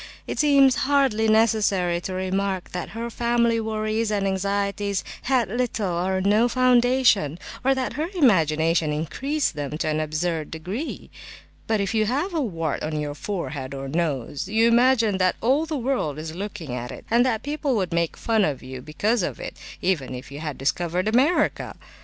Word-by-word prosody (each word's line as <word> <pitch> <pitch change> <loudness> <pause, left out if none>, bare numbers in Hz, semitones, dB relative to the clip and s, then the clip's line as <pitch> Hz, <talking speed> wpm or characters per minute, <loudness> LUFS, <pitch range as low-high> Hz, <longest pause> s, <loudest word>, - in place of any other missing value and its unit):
It - - -5
seems 275 -3 +5
hardly 270 -6 +3
necessary 205 -6 +2
to 185 - -5
remark 190 0 -2
that 180 -1 -4
her 235 +1 -4
family 235 0 +1
worries 220 0 -1
and 205 -2 0
anxieties 200 +1 -1 0.3
had 255 -5 +3
little 220 -3 -1
or 185 +2 0
no 210 +5 +3
foundation, 245 - +3 0.3
or 270 +1 +3
that 260 -1 -2
her 310 +4 -2
imagination 165 - +3
increased 265 - -1
them 145 0 -4
to 160 - -2
an 155 0 0
absurd 155 +1 -2
degree; 185 - -6 0.6
but 220 -1 +1
if 200 +2 -1
you 215 -1 +2
have 290 - -1
a 325 - 0
wart 165 - -2
on 155 0 -2
your 145 -1 -3
forehead 145 -6 -5
or 135 0 -5
nose, 145 -3 -2
you 225 +2 +3
imagine 235 -4 +3
that 185 0 +2
all 275 +7 +2
the 310 -2 -2
world 245 - -1
is 155 +1 -6
looking 175 -7 -6
at 125 0 -4
it, - - -10
and 235 +1 +5
that 230 -4 0
people 290 -2 -1
would 185 -5 -1
make 170 -1 0
fun 220 -2 +1
of 145 -7 -1
you 130 0 -7
because 205 - 0
of 175 - -3
it, - - -6 0.3
even 150 -9 0
if 125 +2 -9
you 140 - -7
had 150 -3 -5
discovered 175 +7 -1
America! 260 +10 +2
200 Hz, 175 wpm, -24 LUFS, 160-240 Hz, 0.6 s, seems